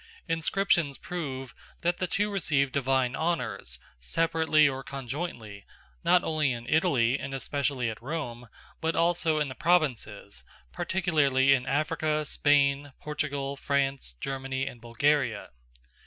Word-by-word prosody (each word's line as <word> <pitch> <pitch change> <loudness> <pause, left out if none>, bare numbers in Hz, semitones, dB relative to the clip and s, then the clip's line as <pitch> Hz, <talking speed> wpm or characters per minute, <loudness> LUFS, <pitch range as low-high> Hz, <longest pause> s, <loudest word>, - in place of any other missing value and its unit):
Inscriptions 165 -2 +1
prove 135 -7 -5 0.3
that 175 +1 +1
the 185 - -1
two 205 +4 0
received 145 -8 +1
divine 130 -2 +1
honours, 120 - -2 0.2
separately 160 - +3
or 135 -1 -3
conjointly, 125 - -5 0.4
not 180 -1 +4
only 155 -4 +1
in 120 0 -7
Italy, 135 -7 +3
and 135 - -5
especially 140 -2 -1
at 110 0 -5
Rome, 125 -4 -5 0.3
but 160 +1 0
also 165 -2 +2
in 150 - +1
the 130 - -6
provinces, 130 - 0 0.3
particularly 140 - +3
in 125 -2 0
Africa, 155 +1 0
Spain, 140 -1 +2
Portugal, 145 -2 -3
France, 135 - -1
Germany, 135 0 -3
and 120 - -7
Bulgaria. 120 - +1
140 Hz, 125 wpm, -28 LUFS, 130-160 Hz, 0.4 s, not